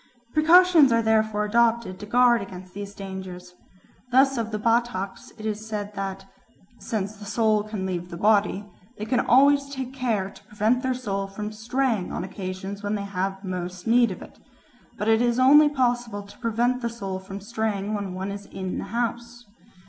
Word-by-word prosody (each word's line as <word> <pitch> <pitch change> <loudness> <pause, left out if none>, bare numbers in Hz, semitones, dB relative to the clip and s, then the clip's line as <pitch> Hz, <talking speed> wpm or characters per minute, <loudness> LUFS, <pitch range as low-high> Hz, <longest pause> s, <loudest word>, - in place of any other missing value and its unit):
Precautions 325 -2 +6
are 230 0 +3
therefore 220 -1 +2
adopted 230 -3 +1
to 210 - -8
guard 240 +1 +4
against 185 -2 -9
these 200 0 -7
dangers. 190 -2 -8 0.6
Thus 270 +2 +5
of 230 -3 -2
the 215 - -3
Bataks 225 -3 -1
it 215 - -8
is 215 0 -3
said 210 -1 -4
that 195 -1 -5 0.5
"since 210 -1 -3
the 205 - -10
soul 215 0 +2
can 210 -2 -5
leave 180 -1 -3
the 170 - -7
body, 205 0 +2 0.3
they 215 - -4
always 280 +2 +4
take 265 -2 -5
care 225 -7 -1
to - - -17
prevent 220 +4 +1
their 260 -1 0
soul 200 -6 -3
from 210 +2 -6
straying 225 -2 -1
on - - -3
occasions 190 +1 -6
when 205 0 -2
they 200 - -3
have 195 0 -3
most 180 -1 -5
need 235 0 +4
of 185 - -7
it. - - -15 0.6
But 210 - -3
it 225 +1 +4
is 240 -1 +2
only 290 +4 +7
possible 240 -6 -1
to 200 +1 -16
prevent 240 +2 0
the 235 - -1
soul 195 -5 -5
from 195 +1 -8
straying 215 -1 -2
when 200 -3 -3
one 190 +2 -4
is 200 0 -8
in 190 -1 -5
the - - -5
house. 235 +2 -4
215 Hz, 180 wpm, -25 LUFS, 195-240 Hz, 0.6 s, only